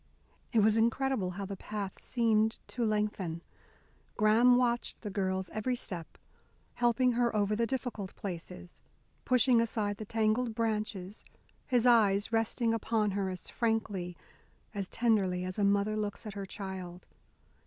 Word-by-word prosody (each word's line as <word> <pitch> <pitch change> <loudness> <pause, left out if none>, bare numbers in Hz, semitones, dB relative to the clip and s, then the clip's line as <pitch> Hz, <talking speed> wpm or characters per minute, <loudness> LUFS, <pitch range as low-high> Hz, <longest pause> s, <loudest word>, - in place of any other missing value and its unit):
It 225 - +4
was 215 +1 +4
incredible 235 -2 +1
how 200 - -3
the 195 +1 -5
path 200 0 -6
seemed 225 -2 +2
to 240 - -2
lengthen. 210 -6 -1 0.7
Graham 225 +4 +5
watched 240 -1 0
the 210 - -5
girl's 190 -1 -1
every 245 +4 -1
step, 180 -9 -7 0.6
helping 245 +1 +3
her 235 -1 +1
over 210 0 +2
the 230 +1 +1
difficult 245 -7 -4
places, 180 -1 -7 0.4
pushing 250 -1 +4
aside 210 -3 -1
the 215 - -6
tangled 225 +2 0
branches, 215 -4 -2 0.4
his 245 -3 +2
eyes 215 -3 +4
resting 225 +1 +1
upon 220 -2 0
her 195 -1 -1
as 185 -2 -7
frankly, 205 -6 -1 0.6
as 200 -3 -3
tenderly 195 -6 +1
as 185 +3 -4
a - - +2
mother 200 +1 +2
looks 210 +1 -3
at 210 - -6
her 200 -1 -5
child. 190 -3 -7
215 Hz, 145 wpm, -31 LUFS, 195-230 Hz, 0.7 s, Graham